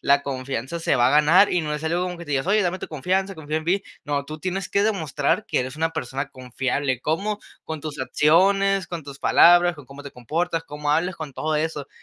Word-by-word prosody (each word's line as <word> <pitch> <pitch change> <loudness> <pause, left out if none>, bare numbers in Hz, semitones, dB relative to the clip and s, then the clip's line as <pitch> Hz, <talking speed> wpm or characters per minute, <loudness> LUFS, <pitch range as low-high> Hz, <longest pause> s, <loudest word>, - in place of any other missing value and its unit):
la 140 0 +3
confianza 130 +2 -4
se 165 - +1
va 120 0 +4
a - - +1
ganar, 155 +7 +5
y 180 - +2
no 150 -1 -3
es 150 - -5
algo 170 +3 0
como 180 -1 -4
que 170 - -8
te 150 - -10
digas: 140 +3 0
"Oye, 210 +1 +3
dame 185 +1 -1
tu - - -6
confianza, 190 +6 -1
confía 155 0 -4
en 160 - -3
mí". 190 +4 +1 0.2
No, 145 -1 -1
tú 155 +1 -8
tienes 185 +2 -3
que 200 +1 +1
demostrar 160 -2 0
que - - +1
eres 130 +2 -3
una 165 +1 -1
persona 135 -2 -4
confiable, 130 0 -2
¿cómo?, 200 +9 -1 0.2
con 160 -2 -5
tus 150 -1 -6
acciones, 195 +5 +3
con 170 -3 -6
tus 140 -1 -10
palabras, 175 0 +5
con 145 -4 -13
cómo 140 +1 -12
te 140 - -9
comportas, 165 +7 -2
cómo 150 0 -6
hablas, 175 +4 0
con 155 -4 -7
todo 155 +3 -1
eso. 150 -2 -3
155 Hz, 235 wpm, -23 LUFS, 140-180 Hz, 0.2 s, ganar